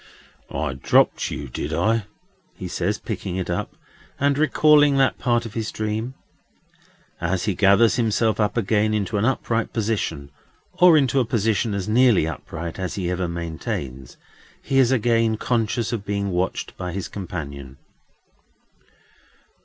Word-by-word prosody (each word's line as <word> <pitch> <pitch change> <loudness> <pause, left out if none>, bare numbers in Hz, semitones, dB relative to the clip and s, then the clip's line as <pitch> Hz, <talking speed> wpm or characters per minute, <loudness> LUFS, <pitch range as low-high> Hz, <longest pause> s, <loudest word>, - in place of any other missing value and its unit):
"I 65 - -2
dropped 65 - +2
you, 70 - -5
did 60 - -5
I?" 110 -1 +1 0.5
he - - -6
says, - - -1
picking 90 -2 -5
it 95 -1 -3
up, - - -3 0.4
and 140 0 +2
recalling 150 -1 +4
that 135 -1 +2
part 120 -1 +1
of 110 - -8
his 110 -2 -3
dream. 110 +4 -3 1.1
As 90 +2 -1
he 105 - +1
gathers 100 +6 +4
himself 110 -1 +1
up 105 +1 0
again 110 0 +1
into 105 +1 -1
an 100 - +1
upright 115 -3 -1
position, 100 -11 -2 0.4
or 175 -2 +6
into 135 -2 +2
a - - +3
position 110 -2 0
as 95 -2 -3
nearly 115 -5 +4
upright 80 +2 -6
as 90 -3 -3
he 90 -3 -2
ever 90 0 -1
maintains, 80 -6 -5 0.5
he 135 - +1
is 130 -1 +4
again 115 -2 +2
conscious 115 0 -1
of 110 -4 -3
being 100 -1 -2
watched 90 +1 -2
by 90 -1 -5
his 95 0 -4
companion. 70 -8 -7
105 Hz, 145 wpm, -23 LUFS, 90-115 Hz, 1.1 s, or